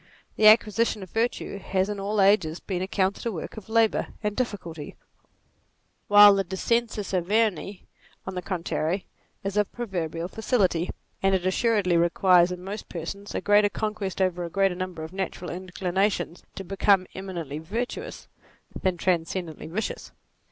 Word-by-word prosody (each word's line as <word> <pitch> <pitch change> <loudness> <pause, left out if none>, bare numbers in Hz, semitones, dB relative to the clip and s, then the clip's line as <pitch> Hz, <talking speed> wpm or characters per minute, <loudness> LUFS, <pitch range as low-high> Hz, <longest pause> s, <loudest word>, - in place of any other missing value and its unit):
The 215 - +5
acquisition 215 -1 +4
of 185 - -12
virtue 225 -3 -1
has 190 0 0
in 205 -1 -4
all 205 +2 -1
ages 190 -5 +3
been 185 -3 -4
accounted 190 +1 -1
a - - 0
work 170 -6 -6
of 220 -1 -10
labour 225 -1 +2 0.2
and 210 -1 -1
difficulty, 175 - -4 1.1
while 205 0 +9
the 195 0 +1
dcscensus 210 +2 -1
Averni 200 0 0 0.4
on 190 - -5
the 180 - -3
contrary 180 0 -2 0.4
is 195 +1 -3
of 210 -1 +1
proverbial 175 -7 -3
facility: 190 -5 0 0.3
and 195 0 +3
it 185 -1 -2
assuredly 190 -2 +2
requires 175 +1 +4
in 180 0 -6
most 200 +3 -6
persons 195 +4 -6
a - - -1
greater 205 0 +4
conquest 210 -3 -3
over 180 -1 -1
a 170 - -4
greater 195 +1 +2
number 180 -3 -5
of 160 +3 -8
natural 190 -2 -4
in 185 +1 -7
clinations 185 0 -1
bo 195 - -6
become 195 0 +3
eminently 170 -7 -5
virtuous 240 - -5 0.5
than 185 -2 0
tran 170 -2 +1
scendently 165 -4 -5
vicious. 205 +6 -4
190 Hz, 155 wpm, -26 LUFS, 180-210 Hz, 1.1 s, while